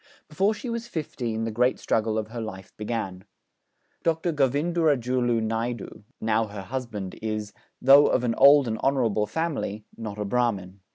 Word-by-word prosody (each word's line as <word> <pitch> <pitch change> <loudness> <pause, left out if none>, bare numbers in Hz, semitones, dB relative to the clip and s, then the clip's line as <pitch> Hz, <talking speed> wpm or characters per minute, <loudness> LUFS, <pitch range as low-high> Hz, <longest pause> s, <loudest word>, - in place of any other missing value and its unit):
Before 195 +8 +1
she 250 - -7
was 235 0 -3
fifteen 120 - -3
the 115 - -2
great 125 +4 +2
struggle 110 0 0
of 110 0 -3
her 115 0 -5
life 95 -4 -8
began. 105 -4 -4 0.8
Dr. 165 +1 0
Govindurajulu 135 -5 +1
Naidu, 115 -1 -3 0.2
now 110 0 +1
her 100 -1 -7
husband, 110 -5 -5
is, 110 -1 -3 0.3
though 140 +3 +7
of - - +1
an 120 -2 +1
old 140 0 +7
and 110 -1 -2
honourable 115 -6 +1
family, 110 -7 -3
not 110 -3 -6
a 105 - -2
Brahmin. 100 -5 -1
115 Hz, 155 wpm, -26 LUFS, 110-140 Hz, 0.8 s, though